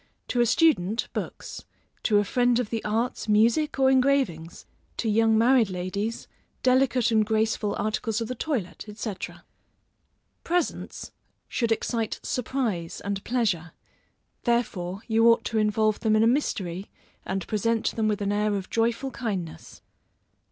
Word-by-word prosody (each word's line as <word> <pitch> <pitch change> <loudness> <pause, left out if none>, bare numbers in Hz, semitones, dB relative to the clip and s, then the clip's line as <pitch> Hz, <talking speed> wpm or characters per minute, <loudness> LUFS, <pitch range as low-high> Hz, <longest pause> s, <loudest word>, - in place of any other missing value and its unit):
to 245 - +1
a 240 - +3
student, 230 - +2
books; - - -6 0.4
to 210 - +3
a 205 - +4
friend 245 +3 +2
of 245 -4 -2
the 225 -2 -2
arts, 225 +4 -1
music, 235 +9 +3
or 265 -1 +4
engravings; 260 - +1 0.3
to 230 - -2
young 220 +1 +3
married 235 -1 +4
ladies, 185 +5 -3 0.4
delicate 255 -2 +3
and 220 -1 +4
graceful 215 -1 0
articles 215 +1 -1
of 230 - -3
the 255 - -3
toilet, 225 - -3
&c. 215 0 -3 1.3
Presents 350 +1 -2 0.4
should 235 -2 -1
excite 225 0 -1
surprise 230 -9 -2
and 200 -1 -3
pleasure, 205 -9 -1 0.7
therefore 205 -6 -1
you 225 0 +4
ought 230 - +4
to 225 - 0
involve 215 0 +2
them 220 -2 +2
in 215 - +4
a - - +5
mystery, 195 - -1 0.3
and 190 -1 -3
present 225 +1 0
them 220 -1 +1
with 210 -1 -1
an 200 - 0
air 210 0 +1
of 195 -2 -5
joyful 235 +4 0
kindness. 195 -11 -5
220 Hz, 145 wpm, -26 LUFS, 205-240 Hz, 1.3 s, a